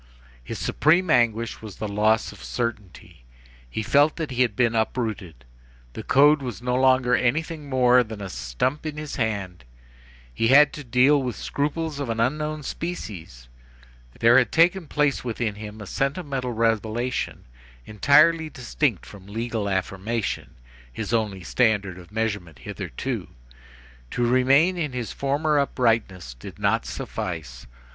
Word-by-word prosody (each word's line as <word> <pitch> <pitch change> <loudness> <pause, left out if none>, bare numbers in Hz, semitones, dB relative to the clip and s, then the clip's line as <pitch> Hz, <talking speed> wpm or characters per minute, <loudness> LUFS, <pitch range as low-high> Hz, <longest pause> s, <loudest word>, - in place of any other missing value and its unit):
His - - -6
supreme 170 +3 +2
anguish 115 -3 +1
was 110 -3 -9
the 110 - -4
loss 105 +2 +1
of - - -13
certainty. 105 - -5 0.5
He 110 - -3
felt 145 +6 +3
that 160 -4 -4
he 125 0 -1
had 120 -5 +2
been 120 -1 +2
uprooted. 110 - -2 0.5
The - - -6
code 145 +2 +4
was 125 -5 -5
no 125 0 -2
longer 130 -1 +3
anything 150 +4 0
more 125 -1 +4
than 110 -2 -8
a 100 - -5
stump 95 - -2
in 150 -1 -5
his 150 -1 -6
hand. 100 - -3 0.7
He 115 - +1
had 140 +3 +6
to 150 - -7
deal 130 +4 +4
with 125 -3 -3
scruples 150 +1 -3
of 140 -4 -3
an 115 0 -2
unknown 150 +5 -1
species. 95 - -6 0.7
There 120 +2 +6
had 125 - 0
taken 170 +1 +3
place 150 -1 0
within 115 -2 -2
him 105 +1 -9
a 105 - -8
sentimental 135 - -2
revelation 115 +2 -1 0.4
entirely 155 +8 +4
distinct 125 - -2
from 100 -2 -13
legal 110 -1 -3
affirmation, 95 +3 -3 0.4
his - - -5
only 105 -5 -1
standard 105 -3 +1
of 90 +1 -15
measurement 100 - -3
hitherto. - - -5 0.8
To 120 - -1
remain 135 +9 +4
in 150 -5 -2
his 120 -3 -4
former 145 +2 0
uprightness 115 - 0
did - - -11
not 105 +3 0
suffice. 85 - -6
120 Hz, 145 wpm, -24 LUFS, 105-140 Hz, 0.8 s, had